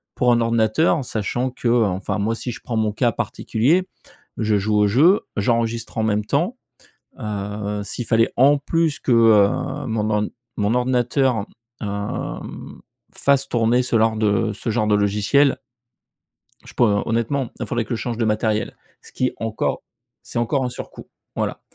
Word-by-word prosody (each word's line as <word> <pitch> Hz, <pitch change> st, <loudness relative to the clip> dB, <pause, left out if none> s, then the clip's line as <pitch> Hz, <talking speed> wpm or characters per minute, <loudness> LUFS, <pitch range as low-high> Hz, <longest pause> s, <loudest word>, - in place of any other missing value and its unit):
pour 125 Hz, -1 st, +3 dB
un 120 Hz, -, +2 dB
ordinateur 115 Hz, +6 st, +2 dB
sachant 120 Hz, +4 st, -2 dB
que, 125 Hz, -1 st, -5 dB
heu, 120 Hz, -1 st, +4 dB
enfin 95 Hz, 0 st, -2 dB
moi 110 Hz, +3 st, 0 dB
si 125 Hz, -, -5 dB
je 125 Hz, -, -8 dB
prends 115 Hz, -, -3 dB
mon 110 Hz, -1 st, +1 dB
cas 120 Hz, +3 st, +1 dB
particulier, 160 Hz, +12 st, 0 dB, 0.5 s
je 110 Hz, -2 st, +1 dB
joue 105 Hz, +2 st, 0 dB
au 105 Hz, 0 st, +4 dB
jeu, 160 Hz, -, +4 dB, 0.2 s
j'enregistre 115 Hz, +2 st, -1 dB
en 110 Hz, -, +1 dB
même 105 Hz, -1 st, 0 dB
temps, 170 Hz, -, 0 dB, 0.6 s
heu, 105 Hz, 0 st, -4 dB
s'il 120 Hz, +3 st, -5 dB
fallait 115 Hz, -1 st, +3 dB
en 140 Hz, +3 st, +5 dB
plus 160 Hz, +1 st, 0 dB
que, 125 Hz, -, 0 dB
heu, 110 Hz, -3 st, +6 dB, 0.4 s
mon 110 Hz, -1 st, -1 dB
or 105 Hz, 0 st, +1 dB, 0.3 s
mon 105 Hz, +2 st, +1 dB
ordinateur, 125 Hz, -2 st, +1 dB, 0.3 s
hem, 100 Hz, -1 st, -5 dB, 0.3 s
fasse 140 Hz, -1 st, +2 dB
tourner 120 Hz, +1 st, +2 dB
ce 120 Hz, -1 st, 0 dB
genre 110 Hz, 0 st, +3 dB
de 110 Hz, +1 st, +1 dB
ce 105 Hz, -, -6 dB
genre 110 Hz, -1 st, 0 dB
de 105 Hz, -, +3 dB
logiciel 105 Hz, +7 st, +3 dB, 1.1 s
je -, -, -13 dB
peux 120 Hz, -, +3 dB, 0.2 s
honnêtement 115 Hz, +3 st, -1 dB
il -, -, -4 dB
faudrait 120 Hz, -2 st, -1 dB
que 120 Hz, -, -3 dB
je 110 Hz, -, -4 dB
change 120 Hz, -2 st, -3 dB
de 115 Hz, -, +1 dB
matériel, 110 Hz, 0 st, 0 dB, 0.2 s
ce -, -, -16 dB
qui 130 Hz, 0 st, 0 dB
encore 110 Hz, -1 st, -2 dB, 0.4 s
c'est, -, -, -5 dB
encore 130 Hz, +3 st, 0 dB
un -, -, -1 dB
surcoût, -, -, -9 dB, 0.3 s
voilà. -, -, -2 dB
115 Hz, 170 wpm, -21 LUFS, 105-125 Hz, 1.1 s, heu